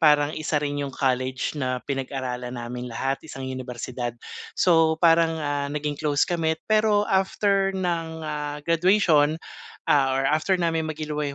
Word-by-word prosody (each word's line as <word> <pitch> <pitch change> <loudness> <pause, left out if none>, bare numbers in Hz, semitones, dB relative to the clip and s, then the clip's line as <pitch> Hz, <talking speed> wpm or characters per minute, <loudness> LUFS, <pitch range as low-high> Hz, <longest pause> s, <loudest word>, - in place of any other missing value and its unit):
parang 150 -1 +4
isa 155 0 -2
rin 145 -1 -1
'yong 140 - -2
college 130 -1 0
na 130 -4 -2
pinag-aralan 130 -2 -4
namin 120 +1 -5
lahat, 135 +3 -2
isang 135 -4 -8
unibersidad. 125 -2 -5 0.4
So 165 -3 +4
parang, 165 -1 +4
ah, 145 -2 -2
naging 145 0 -3
close 145 -2 +2
kami. 160 -2 0
Pero 215 -1 +3
after 195 0 +2
ng 165 -3 -2 0.4
graduation, 165 -3 +3 0.5
ah, 135 -2 +4
or 135 - +1
after 155 +7 +2
namin 165 -2 0
maghiliway 150 -2 -3
150 Hz, 140 wpm, -25 LUFS, 135-165 Hz, 0.5 s, parang